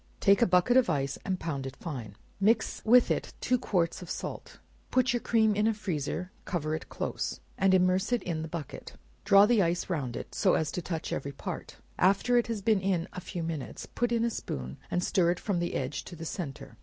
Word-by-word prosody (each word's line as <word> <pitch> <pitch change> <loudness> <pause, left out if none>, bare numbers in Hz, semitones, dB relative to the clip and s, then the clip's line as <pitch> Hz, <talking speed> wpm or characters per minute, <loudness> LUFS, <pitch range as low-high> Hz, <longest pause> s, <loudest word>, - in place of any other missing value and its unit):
Take 200 +3 +4
a 235 - +5
bucket 185 +7 +4
of 255 -7 +4
ice 140 -3 -1
and 185 -1 -2
pound 140 -5 -3
it 135 - -8
fine; 125 - -6 0.2
mix 220 +3 +2
with 245 +2 +6
it - - -2
two 250 0 +1
quarts 180 -8 0
of 180 - -9
salt; - - -6 0.3
put 255 0 +2
your 240 - +1
cream 220 -2 +3
in 210 +1 +2
a 225 - +2
freezer; 180 -2 -3
cover 155 -4 -2
it 155 - -4
close, - - -3 0.2
and 195 -1 +3
immerse 185 +2 +3
it 245 - +1
in 165 -3 -2
the 160 - -4
bucket; 160 -4 -7 0.3
draw 200 0 +7
the 225 -1 +4
ice 175 +1 0
round 135 -8 -2
it, - - -7
so - - +3
as 155 -1 0
to 180 - -3
touch 165 -2 -4
every 140 +1 -3
part; - - -6 0.2
after 200 +6 +3
it 240 - +3
has 225 -4 -3
been 215 -3 +3
in 185 -3 0
a 180 - -6
few 175 -1 -5
minutes, 160 -4 -5
put 240 0 -2
in 230 -1 +2
a 235 - 0
spoon, 65 - -5
and 180 - 0
stir 175 -2 +3
it 175 - 0
from 200 -5 -1
the 175 - -2
edge 135 +3 -2
to 175 - -9
the 165 0 -7
centre. 155 -5 -6
180 Hz, 225 wpm, -29 LUFS, 160-215 Hz, 0.3 s, draw